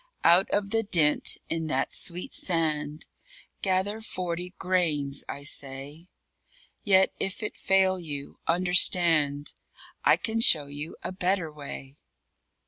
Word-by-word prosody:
_Out 175 Hz, +3 st, +5 dB
of 200 Hz, -1 st, -2 dB
the 225 Hz, -, +1 dB
dint 165 Hz, -8 st, +2 dB
in 165 Hz, -1 st, -3 dB
that 135 Hz, -3 st, -1 dB
sweet 180 Hz, +1 st, -2 dB
sand 155 Hz, -3 st, -2 dB, 0.6 s
Gather 195 Hz, +3 st, -1 dB
forty 180 Hz, -3 st, -5 dB
grains, 155 Hz, -7 st, -1 dB
I 140 Hz, -, -6 dB
say; 140 Hz, +3 st, -5 dB, 0.8 s
Yet 190 Hz, -3 st, +3 dB
if 195 Hz, +3 st, -3 dB
it 210 Hz, -, -4 dB
fail 190 Hz, -1 st, +1 dB
you 145 Hz, -4 st, -6 dB
understand 165 Hz, -4 st, +3 dB, 0.5 s
I -, -, +4 dB
can 225 Hz, 0 st, -3 dB
show 155 Hz, -9 st, +8 dB
you 145 Hz, +3 st, -6 dB
a -, -, -4 dB
better 185 Hz, -3 st, -1 dB
way. 140 Hz, -1 st, -9 dB
170 Hz, 125 wpm, -26 LUFS, 150-185 Hz, 0.8 s, show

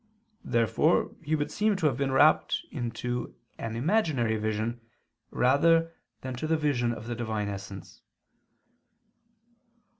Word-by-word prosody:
Therefore 115 Hz, -3 st, +2 dB
he 155 Hz, +2 st, 0 dB
would 145 Hz, -1 st, -2 dB
seem 210 Hz, 0 st, +1 dB
to 185 Hz, -4 st, -2 dB
have 140 Hz, -5 st, +3 dB
been 135 Hz, +1 st, -1 dB
rapt 145 Hz, +4 st, +4 dB
to 120 Hz, -1 st, -4 dB, 0.2 s
an 115 Hz, -1 st, -4 dB
imaginary 135 Hz, -, +1 dB
vision 110 Hz, +2 st, -2 dB, 0.5 s
rather 165 Hz, +6 st, +3 dB, 0.3 s
than 130 Hz, 0 st, -5 dB
to 155 Hz, -, -3 dB
the 160 Hz, 0 st, +2 dB
vision 135 Hz, -6 st, +1 dB
of 115 Hz, -, -6 dB
the 120 Hz, -, -3 dB
Divine 110 Hz, -3 st, -2 dB
essence. 100 Hz, -1 st, -8 dB
125 Hz, 125 wpm, -28 LUFS, 115-155 Hz, 0.5 s, rapt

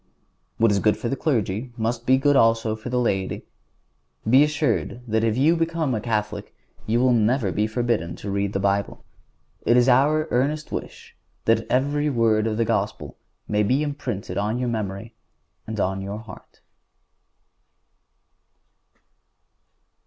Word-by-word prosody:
What 115 Hz, -1 st, +4 dB
is 100 Hz, -, +2 dB
good 105 Hz, +1 st, +2 dB
for 120 Hz, -, -3 dB
the 135 Hz, -, -1 dB
clergy 120 Hz, -4 st, -1 dB
must 115 Hz, +1 st, -2 dB
be 130 Hz, +1 st, +5 dB
good, 145 Hz, +1 st, +3 dB
also, 115 Hz, -3 st, +3 dB
for 110 Hz, +3 st, -8 dB
the 125 Hz, -, -1 dB
laity. 95 Hz, -6 st, -1 dB, 0.8 s
Be 130 Hz, +5 st, +6 dB
assured 150 Hz, -4 st, -1 dB
that 110 Hz, 0 st, +1 dB
if 115 Hz, 0 st, +1 dB
you 155 Hz, +6 st, +4 dB
become 165 Hz, -4 st, -1 dB
a 110 Hz, -, -2 dB
Catholic 105 Hz, -2 st, -3 dB, 0.3 s
you 115 Hz, +2 st, +2 dB
will 125 Hz, 0 st, +4 dB
never 115 Hz, -2 st, +2 dB
be 105 Hz, +3 st, 0 dB
forbidden 110 Hz, -7 st, -1 dB
to 100 Hz, -, -6 dB
read 100 Hz, 0 st, -1 dB
the 100 Hz, -, 0 dB
Bible. 100 Hz, 0 st, -1 dB, 0.6 s
It 120 Hz, -, +4 dB
is 125 Hz, +1 st, +4 dB
our 145 Hz, +5 st, +3 dB
earnest 145 Hz, +5 st, 0 dB
wish -, -, -7 dB, 0.3 s
that -, -, +2 dB
every 145 Hz, +3 st, +1 dB
word 115 Hz, -4 st, +2 dB
of 110 Hz, -1 st, -2 dB
the 115 Hz, -, +1 dB
Gospel 105 Hz, -3 st, -2 dB, 0.3 s
may 105 Hz, 0 st, +1 dB
be 130 Hz, +8 st, +2 dB
imprinted 130 Hz, -10 st, -4 dB
on 105 Hz, +3 st, -1 dB
your 125 Hz, -1 st, -1 dB
memory 110 Hz, 0 st, -4 dB, 0.5 s
and 110 Hz, -1 st, -5 dB
on 95 Hz, 0 st, -1 dB
your 100 Hz, +2 st, -5 dB
heart. 115 Hz, +1 st, -13 dB
115 Hz, 155 wpm, -23 LUFS, 105-130 Hz, 0.8 s, Be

